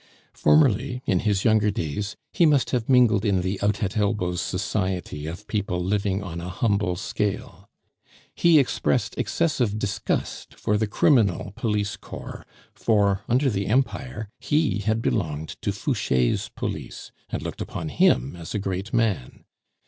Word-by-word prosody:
Formerly, 130 -3 +3
in 90 - +2
his 100 -1 0
younger 110 -2 +4
days, 100 +2 -3 0.2
he 170 -3 +4
must 145 -4 +2
have 120 -2 -1
mingled 120 -6 +5
in 100 -4 +2
the 95 +2 -2
out 105 +2 +1
at 100 0 -2
elbows 100 -4 0
society 95 -5 -2
of 85 +6 -7
people 100 -5 -2
living 100 +1 0
on 85 -3 -6
a 90 - -5
humble 100 -1 0
scale. 100 +2 -3 0.6
He 170 -2 +5
expressed 140 - +1
excessive 130 -11 0
disgust 105 -2 -3
for 105 - 0
the 110 +1 +1
criminal 105 - +2
police 105 -2 -1
corps; - - -9 0.3
for, 100 -3 +2
under 130 +4 +3
the 100 -5 -1
Empire, 110 - -1
he 145 - +1
had 110 +3 0
belonged 80 0 -1
to - - 0
Fouche's 65 -2 0
police, - - -6 0.2
and - - -4
looked - - -5
upon 80 - -4
him 65 0 +2
as 85 +2 -7
a - - +1
great 95 +2 -3
man. 110 - -1
105 Hz, 150 wpm, -24 LUFS, 95-115 Hz, 0.6 s, mingled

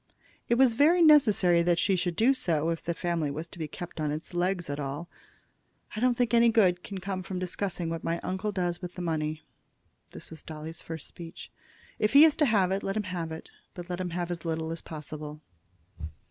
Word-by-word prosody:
It 235 - +4
was 255 -1 +5
very 330 +8 +5
necessary 210 - +6
that 170 0 +2
she 190 +3 +2
should 175 -1 -1
do 240 +8 +4
so, 165 - 0
if 165 - -4
the 170 - -2
family 170 -4 -1
was 155 +4 -5
to 175 - -12
be 155 - -3
kept 170 +1 -7
on 150 - 0
its 155 +4 -5
legs 175 0 0
at 145 0 -4
all. 145 +4 -4 0.9
"I - - -3
don't 245 0 +2
think 245 -1 +1
any 235 0 +6
good 185 -6 +3
can 195 - -7
come 190 0 -4
from 185 +1 -5
discussing 180 -1 -3
what 165 0 -4
my 170 +1 -1
uncle 190 +3 -2
does 175 -2 -2
with 180 -1 -7
the 180 - -5
money." 155 -2 -2 0.7
This - - -9
was 160 - -8
Dolly's 160 +1 -8
first 160 -3 -6
speech. 170 -1 -10 0.5
"If 215 - +1
he 285 +2 +10
is 315 - +4
to 300 - +4
have 195 -5 +3
it, 195 +1 0
let 195 +2 -2
him 215 - 0
have 165 -2 -3
it, 160 - -8 0.2
but 175 0 -7
let 175 - -3
him 180 - -2
have 175 0 -3
as 170 -1 -4
little 160 -1 -2
as 165 - -5
possible." 150 -1 -7
175 Hz, 220 wpm, -28 LUFS, 165-200 Hz, 0.9 s, he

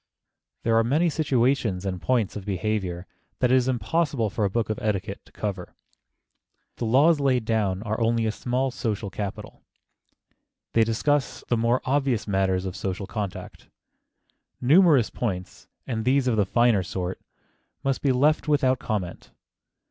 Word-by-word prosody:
There 115 0 +2
are 115 - +4
many 155 +8 +2
situations 125 - +1
and 90 -2 -3
points 120 -6 0
of 105 - -5
behavior 95 -2 -2 0.3
that 125 -1 +2
it - - +6
is 130 -1 +2
impossible 130 - 0
for 110 0 -2
a - - +1
book 110 +2 -1
of 110 - -3
etiquette 100 -2 -2
to - - -21
cover. 105 -3 -5 1.0
The 120 - -3
laws 145 +7 +4
laid 130 -4 +1
down 105 -3 0
are 110 +1 -3
only 115 0 +2
a 110 - +1
small 130 +4 -1
social 105 -5 -3
capital. 100 -1 -6 1.1
They 115 - +5
discuss 130 +6 0
the 120 - +2
more 115 +3 +1
obvious 135 -5 0
matters 95 -2 +1
of 95 - -4
social 95 0 -4
contact. 100 -2 -6 0.9
Numerous 150 - +5
points,—and 110 +3 -5
these 130 +2 +2
of 120 - +2
the 105 -2 +1
finer 120 -2 +3
sort,—must 95 +8 -6
be 140 - +2
left 150 +6 +2
without 130 -4 +2
comment. 100 -6 -4
115 Hz, 150 wpm, -25 LUFS, 100-130 Hz, 1.1 s, it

